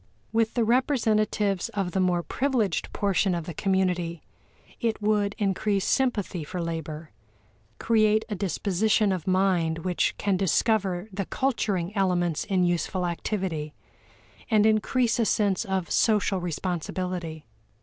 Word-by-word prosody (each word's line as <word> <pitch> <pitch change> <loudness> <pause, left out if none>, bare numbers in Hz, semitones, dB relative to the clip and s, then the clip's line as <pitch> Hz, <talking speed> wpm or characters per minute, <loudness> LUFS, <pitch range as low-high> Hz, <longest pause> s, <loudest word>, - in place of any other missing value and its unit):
With 225 0 +1
the 240 - +2
representatives 220 -5 +1
of 195 -3 -1
the 190 - -1
more 180 -2 +1
privileged 245 - -1
portion 195 -2 +1
of 170 -2 -4
the 170 - -6
community, 180 -3 0 0.6
it 230 -2 -1
would 210 -1 +1
increase 200 -1 0
sympathy 210 - 0
for 175 +5 -6
labor, 160 -2 -5 0.7
create 215 -1 +2
a 220 - -4
disposition 200 +2 +1
of 185 -3 -3
mind 180 -4 +1
which 180 -1 0
can 200 -2 0
discover 195 0 +1
the 195 0 -2
culturing 205 -8 -1
elements 175 -5 +1
in 190 -3 +1
useful 175 +1 0
activity, 170 -4 -3 0.7
and 215 -2 +4
increase 225 +3 +2
a - - +4
sense 205 -3 +1
of 190 -2 -2
social 210 -3 +2
responsibility. 175 -1 -4
190 Hz, 130 wpm, -26 LUFS, 175-215 Hz, 0.7 s, and